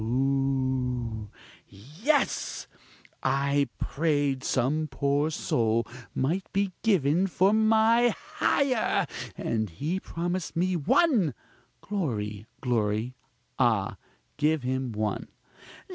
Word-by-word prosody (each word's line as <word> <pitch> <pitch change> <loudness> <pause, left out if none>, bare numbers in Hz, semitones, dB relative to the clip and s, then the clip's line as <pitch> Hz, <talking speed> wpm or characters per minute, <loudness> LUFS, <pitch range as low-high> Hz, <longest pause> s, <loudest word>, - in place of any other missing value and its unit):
(hooh!) 130 -3 0 0.4
yes! 155 - -1 0.6
I 140 +1 +1
prayed 145 -3 0
some 145 +5 +1
poor 140 +2 +1
soul 115 -6 +1 0.3
might 170 +9 -1
be 195 -1 0
given 180 -4 +3
for 190 +2 +3
my 220 +2 +4
hire! 260 -5 +1 0.3
and 110 -2 -1
he 150 - -2
promised 175 0 -3
me 180 +2 +1
one! 180 - +3 0.5
(Glory! 110 - -3
glory! 115 -1 0 0.5
ah! 110 -6 +2 0.4
give 150 -1 +2
him 130 0 -1
one!) 110 0 -2
140 Hz, 90 wpm, -27 LUFS, 120-180 Hz, 0.6 s, my